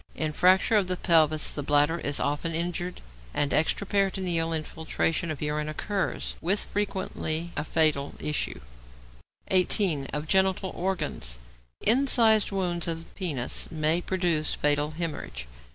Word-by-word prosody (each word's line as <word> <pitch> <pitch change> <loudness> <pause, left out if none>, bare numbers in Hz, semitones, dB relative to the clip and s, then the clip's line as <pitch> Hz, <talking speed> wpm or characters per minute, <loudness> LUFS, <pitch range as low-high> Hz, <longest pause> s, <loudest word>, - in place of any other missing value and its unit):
In 155 -1 -2
fracture 185 +7 +4
of 195 -3 +1
the 185 0 -1
pelvis 155 -4 +3
the 145 - -4
bladder 145 +3 +2
is 145 0 0
often 150 +3 -1
injured, 175 +1 -3 0.3
and 145 -1 +1
extraperitoneal 185 -1 +1
infiltration 160 +1 -2
of 155 -2 -4
urine 150 0 -2
occurs, 195 +5 -3
with 195 +5 0
frequently 175 -5 -3
a 145 - -2
fatal 155 -3 +1
issue. 150 - -2 0.9
18. 180 -6 +3
=Of 150 +2 -4
Genital 190 +1 +1
Organs.= 170 - -2 0.4
Incised 230 -3 +5
wounds 175 -3 -1
of 165 0 -5
penis 145 -10 0
may 160 +1 +1
produce 175 -5 0
fatal 150 +1 0
hæmorrhage. 155 - -4
165 Hz, 125 wpm, -27 LUFS, 150-190 Hz, 0.9 s, Incised